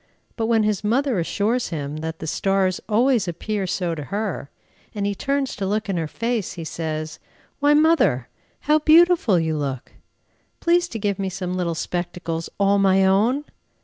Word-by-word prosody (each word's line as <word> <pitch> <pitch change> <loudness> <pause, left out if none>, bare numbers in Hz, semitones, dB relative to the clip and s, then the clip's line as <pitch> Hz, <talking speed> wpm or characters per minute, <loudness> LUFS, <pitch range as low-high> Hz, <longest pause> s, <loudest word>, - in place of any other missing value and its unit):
But 225 -2 -1
when 225 -2 +3
his 210 -2 0
mother 245 +1 +1
assures 210 +8 0
him 150 -3 -4
that 160 +1 -5
the 160 - -7
stars 190 +2 0
always 235 -1 +3
appear 195 +3 -3
so 175 -2 -1
to 150 -3 -6
her, 200 -7 -3 0.5
and 205 -1 -2
he 205 - 0
turns 275 +5 -1
to 195 - -2
look 210 +1 -1
in 190 - 0
her 165 -2 -1
face, 230 +2 -2
he 170 - -7
says, 155 -1 -4 0.4
"Why, 290 +1 +4
mother! 300 - +3 0.3
how 300 +1 +3
beautiful 315 - +5
you 160 -1 -1
look! 135 -4 -4 0.7
Please 345 +1 +2
to 235 - -6
give 200 -2 -1
me 195 -1 -1
some 185 -1 -4
little 175 -2 -1
spectacles, 170 -1 -4
_all 200 0 +3
my 195 -1 +4
own! 225 +10 +2
195 Hz, 175 wpm, -22 LUFS, 170-235 Hz, 0.7 s, beautiful